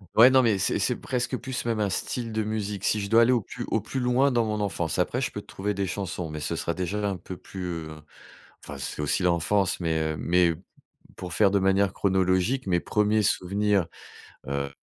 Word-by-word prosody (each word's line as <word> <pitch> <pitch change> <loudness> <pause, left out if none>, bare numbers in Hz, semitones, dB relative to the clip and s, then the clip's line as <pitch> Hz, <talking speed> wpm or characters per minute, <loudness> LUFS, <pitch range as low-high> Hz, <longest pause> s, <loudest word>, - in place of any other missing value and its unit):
Ouais, 120 +3 +9
non, 130 0 +5
mais 115 -5 +2
c'est 95 - +1
c'est - - 0
presque 125 0 -2
plus 130 +1 -4
même 115 -2 -1
un 105 -1 +1
style 115 +5 -3
de 110 0 0
musique, 105 -2 -3
si 105 - +2
je 100 -1 -4
dois 115 +1 +6
aller 115 +2 +5
au 125 - +3
plus 100 - -7
au - - +1
plus 135 - -4
loin 125 +3 +3
dans 120 -3 +2
mon 105 -1 -2
enfance. 95 -5 -2
Après, - - 0
je - - -1
peux - - -5
te - - -12
trouver 105 +2 -3
des 100 0 -2
chansons, 90 -3 -4
mais 75 0 -6
ce 80 +3 -2
sera 85 - -2
déjà 100 +4 -2
un 100 - -2
peu 90 0 -8
plus, 95 -1 -8 0.2
heu, 80 - -9 0.7
enfin, - - -8
c'est - - -5
aussi 75 +5 0
l'enfance, 90 +2 +1
mais 80 -2 0 0.2
heu, - - -6
mais 90 0 +3
p - - -7
p 85 - -19 0.5
pour 90 -2 -7
faire 100 +2 +3
de 100 - +3
manière 95 0 +2
chronologique, 95 +6 +1
mes 90 -2 +2
premiers 105 +2 +1
souvenirs, 100 -1 +1 0.6
heu, 70 0 -2
d 70 - -19
100 Hz, 235 wpm, -26 LUFS, 90-110 Hz, 0.7 s, Ouais